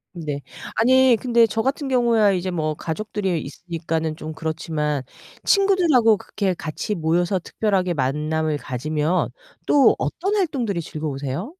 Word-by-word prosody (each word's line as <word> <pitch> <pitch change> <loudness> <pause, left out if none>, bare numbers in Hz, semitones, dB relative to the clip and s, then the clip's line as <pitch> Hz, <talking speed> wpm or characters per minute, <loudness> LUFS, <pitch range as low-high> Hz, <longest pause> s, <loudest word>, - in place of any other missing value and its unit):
네. 150 -4 -4 0.3
아니 255 +1 +5
근데 235 -2 +4
저 225 +1 -1
같은 275 +2 -1
경우야 235 -5 +3
이제 185 0 -2
뭐 155 -3 -1
가족들이 190 0 -2
있으니까는 160 0 -4
좀 155 0 -7
그렇지만 155 -2 -2 0.4
친구들하고 340 - +4
그렇게 195 -2 -2
같이 160 +5 -4
모여서 175 +2 +1
특별하게 185 -2 -1
만남을 150 +3 0
가지면 150 +6 -1 0.4
또 280 -2 +5
어떤 395 +3 -2
활동들이 255 - 0
즐거우세요? 150 - -4
175 Hz, 325 characters per minute, -22 LUFS, 155-230 Hz, 0.4 s, 아니